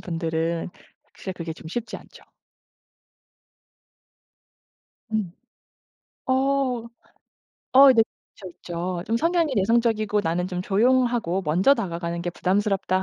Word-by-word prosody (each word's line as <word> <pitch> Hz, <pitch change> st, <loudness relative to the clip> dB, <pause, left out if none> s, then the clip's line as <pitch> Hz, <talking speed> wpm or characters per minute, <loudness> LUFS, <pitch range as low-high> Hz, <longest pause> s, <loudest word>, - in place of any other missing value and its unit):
분들은 165 Hz, 0 st, -2 dB, 0.4 s
사실 190 Hz, -, -6 dB
그게 170 Hz, -2 st, -6 dB
좀 160 Hz, 0 st, -11 dB
쉽지 230 Hz, +4 st, -4 dB
않죠. -, -, -16 dB, 2.9 s
음. 200 Hz, -6 st, -1 dB, 1.0 s
어. 260 Hz, -2 st, +1 dB, 0.9 s
어 275 Hz, 0 st, +10 dB
네 225 Hz, -, +5 dB, 0.3 s
있죠, 190 Hz, -3 st, -9 dB
있죠. 175 Hz, +1 st, -5 dB
좀 230 Hz, -, +1 dB
성향이 330 Hz, +1 st, +1 dB
내성적이고 215 Hz, 0 st, +2 dB
'나는 170 Hz, +2 st, -1 dB
좀 180 Hz, -1 st, -3 dB
조용하고 230 Hz, -3 st, +1 dB
먼저 180 Hz, -, +3 dB
다가가는 170 Hz, -6 st, -4 dB
게 175 Hz, -, -2 dB
부담스럽다.' 190 Hz, 0 st, 0 dB
195 Hz, 220 characters per minute, -24 LUFS, 170-235 Hz, 2.9 s, 어